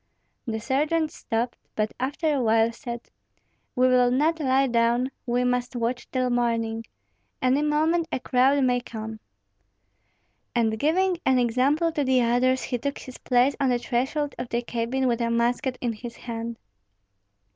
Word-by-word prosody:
The 220 -1 -2
sergeant 300 +6 0
stopped, 240 -6 -3 0.2
but 215 0 -1
after 290 +4 0
a 275 - +1
while 225 0 +3
said, 235 -1 -8 0.6
"We 255 0 +4
will 250 -1 +4
not 305 +6 +2
lie 270 -2 +3
down; 240 +1 +1 0.2
we 245 +1 +1
must 250 0 -1
watch 240 +1 -2
till 255 -1 0
morning. 230 -2 0 0.5
Any 260 +3 +2
moment 315 +3 +1
a - - -1
crowd 265 +3 +3
may 250 -1 +2
come." 220 -2 -7 1.4
And 220 -2 +1
giving 355 +5 +2
an 260 -1 +3
example 260 +7 +2
to 305 -3 -1
the 260 -1 +3
others, 255 +2 +2
he 245 -2 -2
took 280 +3 -3
his 255 - -10
place 250 +2 +2
on 275 -2 +2
the 245 - +2
threshold 265 +5 -1
of 245 - -4
the 235 +1 -1
cabin 245 +3 -1
with 240 -1 0
a 235 - +1
musket 245 +3 0
in 240 -2 -1
his 235 +2 -8
hand. 230 -1 -6
250 Hz, 160 wpm, -25 LUFS, 235-275 Hz, 1.4 s, We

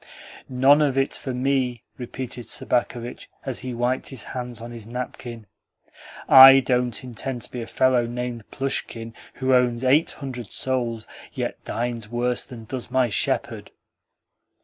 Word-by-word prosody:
"None 135 +3 +5
of 140 -3 +1
it 135 0 +1
for 130 - -5
me," 125 -2 0
repeated 125 -1 -7
Sobakevitch 120 0 -2 0.2
as 130 -3 -2
he 130 0 -5
wiped 125 +2 -1
his 130 -6 -6
hands 125 -2 -6
on 120 +1 -8
his 115 -3 -9
napkin. 120 -1 -6 0.8
"I 135 0 +11
don't 125 -2 0
intend 125 0 -5
to - - -4
be 125 - -5
like 115 - -6
a - - -14
fellow 125 -2 +3
named 120 -2 -5
Plushkin, 115 -4 -3 0.2
who 130 0 +1
owns 125 -1 +2
eight 140 +5 +4
hundred 125 -6 -7
souls, 120 -4 -2 0.3
yet - - -4
dines 115 -2 -3
worse 120 +1 -1
than 115 -3 -11
does 125 +2 -5
my 130 -1 +2
shepherd." 100 - -1
125 Hz, 150 wpm, -24 LUFS, 120-130 Hz, 0.8 s, I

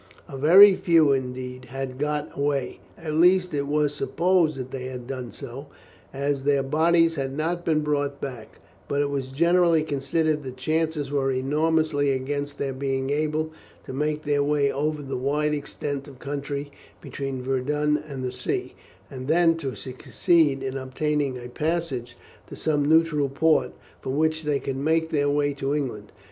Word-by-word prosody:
A - - -8
very 185 +9 +8
few, 165 -5 +4
indeed, 125 -1 -3
had 130 0 -6
got 150 0 -2
away; 140 -2 -1 0.2
at 160 -2 -5
least, 180 +2 +4
it 140 -1 -1
was 150 0 +1
supposed 170 -2 +1
that 130 0 -6
they 130 -1 -5
had 125 -1 -6
done 130 -2 -6
so, 135 +5 -8 0.4
as 140 0 -1
their 140 0 +2
bodies 165 +4 +3
had 135 -2 -3
not 170 +3 -1
been 155 -2 +2
brought 145 -1 -1
back; 125 -5 -8 0.3
but 140 - -1
it 145 0 +1
was 135 -2 -2
generally 170 +3 +3
considered 150 +1 0
that 135 - -6
the 130 - -9
chances 155 +1 -1
were 135 -2 +1
enormously 150 +2 +1
against 140 +2 -2
their 135 -1 -2
being 135 0 -2
able 155 +1 0 0.3
to - - -7
make 150 +2 -1
their 145 -1 +1
way 145 -1 +2
over 150 +1 -2
the 135 -1 -4
wide 150 +4 0
extent 145 -1 -4
of 135 -3 -12
country 140 +1 -4 0.3
between 135 -2 -5
Verdun 150 +3 0
and 135 -3 -6
the 125 - -2
sea, - - -3 0.4
and 130 0 -7
then 165 +1 +4
to 135 -5 -4
succeed 140 +2 +1
in 135 0 -3
obtaining 135 +1 -1
a 120 0 -8
passage 135 -4 -3 0.3
to - - -9
some 150 -2 0
neutral 160 -3 +3
port, 160 +4 +2 0.3
from 130 +2 -3
which 155 0 +1
they 145 -2 +1
could 135 -1 -4
make 160 +3 +1
their 145 -2 +2
way 145 0 +1
to 140 +1 -2
England. 115 -8 -4
145 Hz, 170 wpm, -25 LUFS, 135-155 Hz, 0.4 s, very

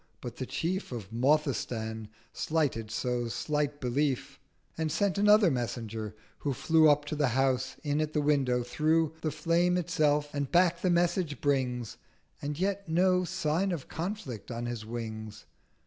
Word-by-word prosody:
But 120 -2 -7
the 130 - -4
chief 185 +1 -2
Of 110 -5 -6
Mothistan 120 -5 0 0.3
slighted 140 -9 -1
so 120 +1 -1
slight 145 +5 -1
Belief, 130 +1 -1 0.4
And 160 -1 -1
sent 200 +4 +1
another 210 -3 +6
Messenger, 115 -4 -3 0.2
who 140 - -1
flew 160 +3 +4
Up 145 0 +3
to 150 - -3
the 145 -2 +2
House, 135 -1 +1
in 145 0 0
at 155 0 -2
the 150 - +1
window, 135 -4 +2
through 155 +5 +1
The 155 - 0
Flame 170 +4 +2
itself; 150 -4 +1
and 140 -2 -2
back 175 -1 +3
the 185 - +2
Message 170 -3 +1
brings, 125 -5 -1 0.4
With 145 0 -3
yet 195 -1 -1
no 180 +2 +3
sign 180 +1 0
of 165 -6 -4
Conflict 160 - -5
on 120 0 -4
his 120 -2 -4
wings. 110 -2 -6
145 Hz, 155 wpm, -30 LUFS, 125-165 Hz, 0.4 s, another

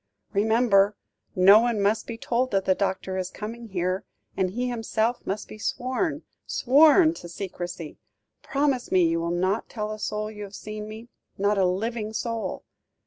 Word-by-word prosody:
"Remember, 210 -1 +3 0.4
no 195 +3 +8
one 235 -2 +1
must 210 +2 +1
be 230 - -5
told 245 +2 0
that 195 -3 0
the 190 - +4
doctor 190 -1 -2
is 185 -1 -3
coming 230 +4 -7
here; 185 -1 -1 0.3
and 190 -1 +1
he 245 +6 -2
himself 230 0 -1
must 205 +2 -3
be 215 - -11
sworn 285 - -2 0.2
sworn 310 +5 +5
to 175 - -10
secrecy. 175 -3 -6 0.4
Promise 275 -2 0
me 185 -1 +5
you 165 0 +1
will 170 0 -2
not 185 +5 0
tell 215 -2 -4
a 215 - -6
soul 215 0 -3
you 210 -1 -8
have 200 0 -9
seen 215 0 -7
me, 220 +2 -9 0.3
not 200 +1 +2
a 190 - +4
living 215 +3 -2
soul." 230 +1 -3
215 Hz, 170 wpm, -26 LUFS, 190-235 Hz, 0.4 s, no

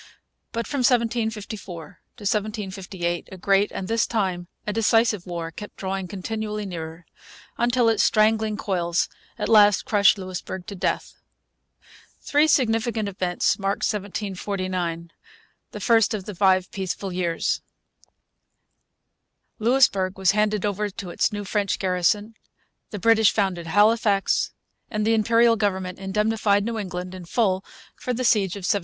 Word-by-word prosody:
But 230 0 -3
from 285 - -3
1754 220 -7 -1 0.3
to - - -15
1758 195 -4 -2
a 190 - -8
great 195 +2 +2
and, 185 - -5
this 225 +1 +1
time, 185 -6 -1 0.2
a 210 - -2
decisive 225 -3 +2
war 170 -2 -4
kept 210 +5 -9
drawing 190 -1 -3
continually 210 +2 -4
nearer, 165 -2 -7 0.5
until 240 0 +3
its 225 -2 +3
strangling 215 0 +2
coils 175 -4 0 0.3
at - - -2
last 205 -2 +5
crushed 200 -1 +4
Louisbourg 185 -1 -6
to 200 - -7
death. 180 - -3 1.0
Three 295 +2 +2
significant 225 -5 +1
events 185 -1 0
marked 195 0 -1
1749, 185 -4 -3 0.6
the - - -8
first 225 -3 +3
of 195 -3 -6
the 210 - -6
five 185 0 +2
peaceful 190 0 -4
years. 175 -2 -1 2.0
Louisbourg 215 -6 +3
was 190 -2 +3
handed 210 0 +1
over 205 +1 -1
to 190 -2 -7
its - - +1
new 205 -1 -4
French 205 0 0
garrison; 190 +4 0 0.6
the 210 - -5
British 220 +1 +4
founded 185 -5 -1
Halifax; 205 +1 +3 0.4
and 215 -2 -1
the 225 - +3
Imperial 230 +1 +4
government 190 -3 -2
indemnified 205 +1 +1
New 230 -1 -2
England 180 -2 -5
in 185 -2 -8
full 190 -1 +1 0.3
for 250 - -3
the 255 - -2
siege 200 -5 +3
of 200 - -7
1745. 200 - +2
205 Hz, 135 wpm, -24 LUFS, 185-220 Hz, 2.0 s, last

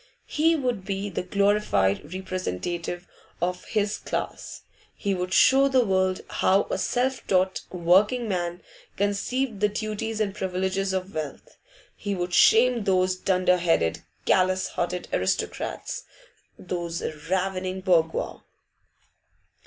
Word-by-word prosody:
He 325 +2 +2
would 250 -9 -1
be 195 +1 -3
the - - -2
glorified 180 - +1
representative 175 - -4 0.3
of 180 +1 -2
his 210 -1 -1
class. - - -5 0.3
He 200 -2 -1
would 180 0 -3
show 270 +7 +6
the 260 -3 +3
world 185 -1 +1
how 195 +2 +2
a - - -1
self 255 +1 -1
taught 185 0 +2
working 195 +8 +3
man 175 -2 -2 0.3
conceived 205 +4 -1
the 210 +1 +3
duties 215 +1 -3
and 205 -3 0
privileges 190 0 -1
of 190 +1 -3
wealth. 155 -2 -6 0.4
He 205 -1 -3
would 175 -1 -3
shame 235 +1 +5
those 185 -1 +2
dunder 185 -1 +2
headed, 165 - +1 0.3
callous 185 0 +2
hearted 180 +1 -3
aristocrats, 95 - -2 0.5
those 175 -2 -4 0.3
ravening 185 0 -1
bourgeois. 170 -4 +1
190 Hz, 120 wpm, -26 LUFS, 180-205 Hz, 0.5 s, show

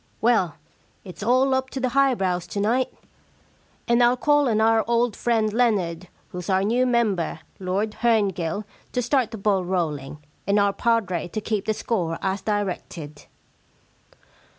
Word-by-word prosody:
Well, 220 -9 +2 0.5
it*s 185 -1 -10
all 255 +5 +3
up 260 0 0
to 265 - -5
the 255 -1 0
high 275 0 +3
brows 180 -3 -1
to 205 - -4
night. 235 +6 +1 1.0
And 235 0 +3
Til 245 +1 +4
call 290 -1 +3
on 215 -2 +1
our 225 0 +4
old 235 -1 +1
friend 220 -3 +1
Leonard, 190 -8 +1 0.2
who's 180 +1 -7
our 190 0 +2
new 245 +5 +2
member, 210 -10 0 0.2
Lord 195 +3 -1
Herngill, 205 -5 +1 0.3
to 250 - +1
start 250 -1 +1
the 225 - -7
ball 195 -2 +1
rolling, 155 -6 -2 0.3
and 200 +1 +3
our 200 -1 +3
padre 200 -8 0
to 195 - -4
keep 215 -1 -2
the 215 - 0
score 175 -9 -2
as 190 0 -1
directed.' 180 -7 -4
210 Hz, 155 wpm, -24 LUFS, 185-235 Hz, 1.0 s, Til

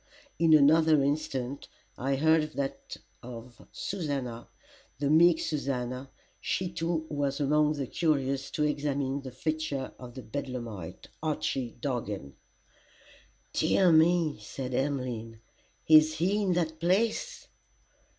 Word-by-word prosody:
In 165 -1 +6
another 155 0 +5
instant, 140 -2 -2 0.3
I 135 +2 -1
heard 155 +1 +2
that 140 -1 -4 0.2
of 120 0 -11
Susannah 140 -10 -4 0.5
the 145 0 0
meek 165 +1 +6
Susannah, 130 -3 -3 0.3
she 180 -1 -2
too 165 -1 -1
was 145 -2 -2
among 150 +1 +3
the 140 -3 -3
curious 135 -3 0
to 150 - -1
examine 140 -2 -1
the 135 - -7
features 145 0 -3
of 125 -2 -10
the 130 - -7
bedlamite, 115 - -6
Archy 135 -5 -2
Dargan. 105 - -4 1.2
"Dear 185 -3 +3
me," 160 -1 +4
said 130 -2 -6
Emmeline, 125 -5 -2 0.5
"is 155 0 +7
he 190 +6 +1
in 190 -3 +1
that 160 -2 -1
place?" 215 - 0
145 Hz, 115 wpm, -29 LUFS, 130-160 Hz, 1.2 s, is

